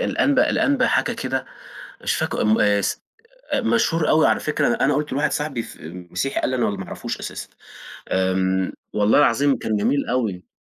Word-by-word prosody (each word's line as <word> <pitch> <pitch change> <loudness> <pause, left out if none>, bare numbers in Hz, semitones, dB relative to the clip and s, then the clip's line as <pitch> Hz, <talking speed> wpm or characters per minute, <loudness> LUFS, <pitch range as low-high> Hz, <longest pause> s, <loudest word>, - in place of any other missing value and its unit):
الأنبا 285 - +2
الأنبا 270 -2 +2
حاجة 235 - +1
كده، 130 - -3 0.6
مش - - 0
فاكره - - -1
م 110 +1 +3
آآ 105 -1 +3
س - - -2 0.5
مشهور 135 +8 +1
أوي 155 - +5
على - - +2
فكرة، 150 -1 0
أنا - - +1
أنا 145 - +2
قُلت 150 -1 -2
لواحد 145 +3 0
صاحبي 150 -6 -2
في 80 - -11 0.2
مسيحي 135 +10 -2
قال - - -1
لي 130 - -1
أنا 120 - +1
ما 95 -2 -5
أعرفوش - - -5
أساسًا، - - -7 0.6
آمم 95 0 +1 0.2
والله 105 +6 +3
العظيم 140 0 +3
كان 110 -1 -2
جميل 140 +7 +1
أوي. 110 -8 -2
125 Hz, 180 wpm, -22 LUFS, 100-150 Hz, 0.6 s, أوي